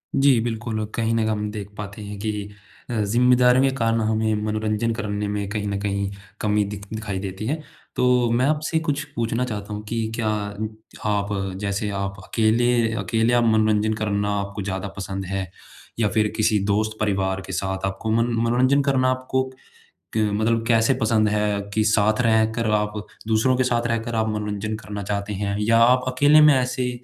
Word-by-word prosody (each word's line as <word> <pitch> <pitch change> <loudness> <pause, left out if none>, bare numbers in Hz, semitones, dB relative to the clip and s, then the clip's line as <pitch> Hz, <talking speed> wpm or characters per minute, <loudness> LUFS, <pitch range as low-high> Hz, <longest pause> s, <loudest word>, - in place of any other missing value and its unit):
जी। 135 -3 +5
बिल्कुल, 110 -1 -3
कहीं 115 -1 0
न - - +2
हम 105 -1 -1
देख 105 -2 -6
पाते 100 0 -7
हैं 105 0 -7
कि 110 +1 -1 0.6
अ, 120 - -3
ज़िम्मेदारियाँ 125 +4 +4
कारण 115 -2 +1
होंगी 110 0 +1
मनोरंजन 110 +1 -1
करने 105 -1 -3
में 100 -1 -2
कहीं 105 -1 -3
न 100 0 -2
कहीं 100 -1 -1 0.3
कमी 105 0 +2
दिख 100 -1 -7
दिखाई 105 -3 -3
देती 95 +2 -5
है। 150 - +1 0.4
तो 125 -1 +3
मैं 125 +2 +2
आपसे 155 +2 +1
कुछ 145 -2 -1
पूछना 115 +1 0
चाहता 105 -3 -5
हूँ 105 - -5
कि 115 0 -1
क्या 115 -2 -1 0.8
आप 100 -1 0 0.3
जैसे 100 +1 -1
आप 100 0 -3
अकेले 115 +3 +2 0.4
अकेले 115 +4 +1
आप 120 -1 +4
मनोरंजन 110 -1 +2
करना 105 -1 -1
आपको 100 +1 -5
ज़्यादा 95 0 -3
पसंद 95 0 -4
है? 95 -1 -4 0.5
या 110 - +3
फिर 110 0 +2
किसी 110 -1 +2
दोस्त 110 +2 0
परिवार 95 -2 0
के 95 - -7
साथ? 95 +1 -2
आपको 95 +3 -3
मन 115 +1 +2
मनोरंजन 130 +4 +3
करना 130 -2 +2
आपको 130 +1 -1 0.7
क - - +3
मतलब 115 +2 +1
कैसे 115 +2 +3
पसंद 110 -1 +3
है 105 -1 0
कि 110 0 +2
साथ 110 +1 +3
रहकर 110 0 +2
आप 105 0 -1 0.4
दूसरों 115 +4 +3
के 130 - +2
साथ 120 -1 +1
रहकर 115 0 -2
आप 110 0 +1
मनोरंजन 105 0 -3
करना 105 -1 -7
चाहते 100 +1 -3
हैं? 100 0 -2
या 115 +2 +3
आप 125 +2 +5
अकेले 145 +4 +6
में 150 -2 +7
ऐसे 125 0 0
110 Hz, 180 wpm, -23 LUFS, 105-120 Hz, 0.8 s, में